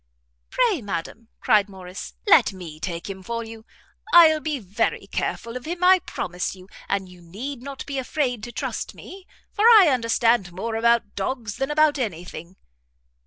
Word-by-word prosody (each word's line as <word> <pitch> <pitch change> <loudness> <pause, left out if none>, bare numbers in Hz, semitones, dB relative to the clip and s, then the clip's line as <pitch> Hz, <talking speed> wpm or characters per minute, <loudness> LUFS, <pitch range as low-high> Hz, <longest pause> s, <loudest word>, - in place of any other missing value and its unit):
"Pray, 455 - +1
ma'am," 205 +3 -5
cried 210 -1 +3
Morrice, 185 -1 -9
"let 285 - +5
me 170 -5 -9
take 170 0 -5
him 195 -1 -7
for 230 +4 -4
you; 225 0 -11 0.4
I'll 320 -3 +7
be 305 -1 -2
very 200 -4 -2
careful 230 +1 -4
of 250 - -6
him, 345 +2 -4
I 370 +1 +7
promise 180 - -4
you; 185 0 -15 0.2
and 195 -1 -1
you 180 -1 -15
need 235 +10 -7
not 275 +1 -7
be 275 -1 -3
afraid 255 -3 -2
to 240 - -8
trust - - -4
me, 380 0 -12 0.2
for 425 - 0
I 435 -8 +8
understand 230 -5 +2
more 225 +6 -4
about 235 -2 +2
dogs 220 +1 -4
than 270 +1 -2
about 300 -1 +3
any 180 -8 -3
thing." 175 +1 -10
230 Hz, 170 wpm, -23 LUFS, 190-285 Hz, 0.4 s, I